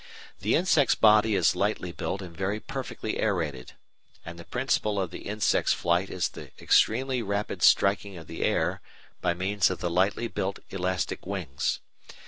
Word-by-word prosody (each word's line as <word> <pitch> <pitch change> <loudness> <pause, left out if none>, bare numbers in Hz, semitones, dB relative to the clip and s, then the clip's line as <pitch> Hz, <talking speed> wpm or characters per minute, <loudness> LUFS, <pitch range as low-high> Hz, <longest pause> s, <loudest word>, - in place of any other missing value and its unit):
The - - +1
insect's 165 -6 +3
body 110 0 +5
is 90 -4 +3
lightly - - -1
built 95 +1 -4
and 85 -2 -10
very 95 +4 -2
perfectly 135 -4 -5
aerated, 80 -11 -2 0.5
and 85 +1 -8
the - - -8
principle 110 -2 0
of 95 -4 -2
the - - -8
insect's 105 0 +2
flight 85 +3 0
is 90 - -1
the - - -10
extremely 130 +2 +2
rapid 100 -1 -3
striking 100 -1 +3
of 80 - -10
the 80 - -7
air - - 0 0.4
by 85 - +1
means 95 +3 +1
of 95 - -3
the 85 - -3
lightly 95 +6 +1
built 100 -3 -3
elastic 95 -2 -2
wings. 90 -9 -2
100 Hz, 160 wpm, -27 LUFS, 90-110 Hz, 0.5 s, body